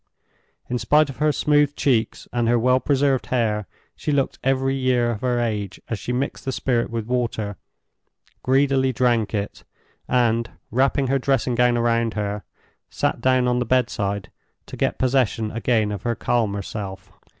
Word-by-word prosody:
In 125 0 -2
spite 145 +6 +3
of - - -14
her 150 0 +2
smooth 145 -1 +2
cheeks 120 -5 0
and 120 -1 +1
her 120 +1 +4
well 125 +2 +3
preserved 140 -2 +1
hair, 110 -5 0 0.3
she 150 - -3
looked 140 -2 0
every 135 0 +1
year 130 -3 +1
of 105 - -5
her 125 -1 +1
age 105 -4 -2
as 115 - -2
she - - -4
mixed 130 +3 -2
the 135 - -2
spirit 120 -2 0
with 115 -2 -3
water, 115 -4 -2 0.9
greedily 135 0 +2
drank 120 -3 +1
it, 100 0 -4 0.4
and, 115 -2 +2 0.2
wrapping 135 +3 +2
her 135 +1 +1
dressing 130 -2 +1
gown 120 0 +3
round 115 -1 +1
her, 105 -1 -3 0.5
sat - - -1
down 130 -1 +3
on 125 0 +1
the - - +1
bedside 105 -6 -1 0.3
to - - -9
get - - 0
possession 125 -4 +1
again 110 -2 +1
of 100 -3 -4
her 120 +1 -1
calmer 105 -6 0
self. 95 -3 -7
120 Hz, 165 wpm, -22 LUFS, 110-130 Hz, 0.9 s, her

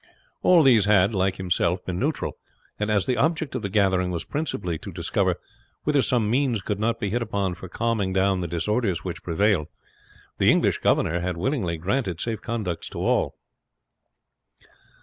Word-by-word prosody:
All 175 -3 +6
these 120 -7 +5
had, 100 0 +4
like 95 -1 +1
himself, 90 -1 0
been 90 -1 -3
neutral, 150 +4 -1 0.4
and 105 +1 -1
as 105 -3 +2
the 125 -1 0
object 160 +3 0
of - - -2
the 100 - -3
gathering 95 -3 +2
was 85 -2 -3
principally 100 - -3
to - - -8
discover - - 0 0.5
whether 145 -2 +3
some 120 -4 +1
means 120 -3 +1
could 105 0 -2
not 115 +1 0
be 100 -4 -2
hit 120 +2 0
upon 100 -5 -1
for 90 +1 -10
calming 110 -1 -1
down 95 0 +2
the 85 - -2
disorders 95 +2 -1
which 90 -2 -5
prevailed, 90 -2 +1 0.7
the - - +5
English - - +3
governor 85 +2 +2
had 90 0 -3
willingly 95 - -1
granted 95 0 -1
safe 110 0 -3
conducts 105 -8 -3
to - - -9
all. - - +1
100 Hz, 170 wpm, -24 LUFS, 90-115 Hz, 0.7 s, All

